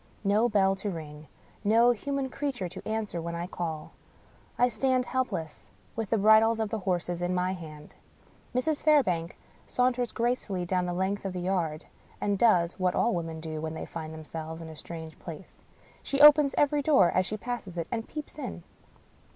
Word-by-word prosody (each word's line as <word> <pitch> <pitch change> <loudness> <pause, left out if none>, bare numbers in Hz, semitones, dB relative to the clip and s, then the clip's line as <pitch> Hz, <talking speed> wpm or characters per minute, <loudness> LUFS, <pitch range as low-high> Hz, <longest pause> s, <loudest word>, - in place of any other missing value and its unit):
No 215 +4 +3
bell 195 -3 +3
to 205 - -3
ring. 155 -4 -8 0.4
No 230 +3 +5
human 275 +3 -2
creature 265 -11 -3
to 180 +2 -9
answer 215 -5 -2
when 170 +1 -4
I 170 +1 -3
call. 165 -4 -5 0.7
I 245 - +5
stand 255 0 +1
helpless, 210 - -3 0.3
with 225 -3 -3
the 225 - +2
bridles 220 +2 +5
of 220 -2 -1
the 220 0 -2
horses 175 -2 -2
in 175 +1 0
my 180 +1 0
hand. 155 -4 -10 0.6
Mrs. 295 +4 0
Fairbank 185 - +2 0.3
saunters 250 -1 +1
gracefully 230 -6 -1
down 180 0 0
the 175 - -2
length 190 +3 -1
of 195 -2 -3
the 180 - -3
yard 175 -4 -1 0.3
and 200 -1 0
does 180 -7 +4
— - - -27
^what 185 -1 +1
all 235 - +2
women 165 -2 -3
do, 155 -1 -5
when 160 0 -4
they - - -5
find 160 -1 -7
themselves 160 +1 -7
in 165 -1 -8
a 160 - -9
strange 160 0 -9
place. 170 +1 -10 0.4
She 275 - -2
opens 295 -1 +8
every 290 0 +3
door 270 - +5
as 185 +1 +1
she 215 - -3
passes 215 -5 -5
it, 165 - -2
and 225 -1 -3
peeps 300 0 -7
in. - - -6
190 Hz, 185 wpm, -28 LUFS, 170-240 Hz, 0.7 s, opens